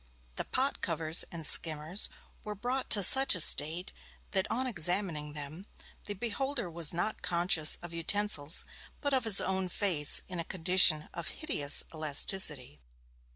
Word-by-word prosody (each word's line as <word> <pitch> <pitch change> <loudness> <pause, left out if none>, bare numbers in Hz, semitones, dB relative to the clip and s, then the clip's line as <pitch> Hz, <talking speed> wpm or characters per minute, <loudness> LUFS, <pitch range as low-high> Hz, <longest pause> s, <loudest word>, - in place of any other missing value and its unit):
The - - -5
pot 270 +2 -5
covers 165 -1 0
and 165 -2 -8
skimmers 160 +5 +1 0.3
were 210 -1 -9
brought 250 +5 -6
to 205 -3 +2
such 265 +4 +7
a - - -6
state 160 +3 +1 0.4
that, 190 0 -3
on 255 +3 -5
examining 175 - -2
them, 155 +6 -12 0.4
the 205 - -7
beholder 240 0 -6
was 165 -2 -1
not 175 +5 -6
conscious 170 -3 +1
of 175 -1 -12
utensils, 165 -3 0 0.3
but 285 -1 -6
of 260 -3 -3
his 215 -3 +7
own 190 -1 -4
face 175 -6 -1
in 180 -2 -9
a - - -5
condition 180 -3 +1
of 170 -1 -9
hideous 150 - +2
elasticity. 150 - +2
180 Hz, 150 wpm, -27 LUFS, 155-205 Hz, 0.4 s, such